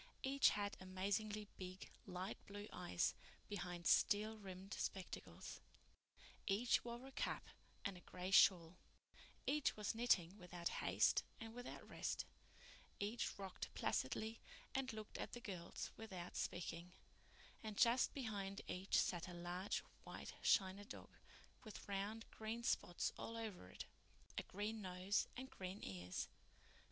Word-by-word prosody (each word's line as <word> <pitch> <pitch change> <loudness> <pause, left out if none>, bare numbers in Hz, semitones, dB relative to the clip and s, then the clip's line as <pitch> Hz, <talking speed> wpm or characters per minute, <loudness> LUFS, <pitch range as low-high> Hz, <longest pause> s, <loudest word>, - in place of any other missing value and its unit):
Each 275 +1 +7
had 205 -1 0
amazingly 205 +3 0
big, 185 0 -6 0.2
light 185 0 -3
blue 205 +1 -5
eyes 90 0 +2 0.3
behind 180 -3 -3
steel 215 +5 +5
rimmed 195 -1 -6
spectacles; 190 -2 -3 0.9
each 225 +4 +4
wore 240 +1 -4
a 270 - -8
cap - - -1 0.4
and 200 -2 0
a - - -8
gray 180 +1 -4
shawl; 180 -2 +8 0.7
each 290 -3 +3
was 210 -1 +1
knitting 210 -5 +4
without 175 -1 -2
haste - - +5 0.2
and 225 -2 -6
without 245 +1 -6
rest; - - -1 0.7
each 215 +4 0
rocked 195 -2 -4
placidly 220 - +1 0.3
and 265 -1 +1
looked 215 -1 -6
at - - -3
the 240 - -3
girls 185 -8 -4
without 185 -5 -5
speaking; 175 0 -2 0.7
and 215 -2 -4
just 240 +2 +6
behind 205 -7 -2
each 185 +2 +2
sat 175 -1 +3
a 180 - -6
large 175 +3 -1 0.2
white - - -6
china 190 +1 +5
dog, 215 - -9 0.5
with 215 -4 -8
round 205 +3 -1
green 220 +2 -3
spots 175 -7 +2
all 230 - -3
over 210 - -4
it, - - -6 0.5
a - - +1
green 210 +3 -2
nose 185 +1 +2
and 260 +1 -5
green 185 +1 -4
ears. 90 -1 -2
200 Hz, 135 wpm, -44 LUFS, 180-220 Hz, 0.9 s, shawl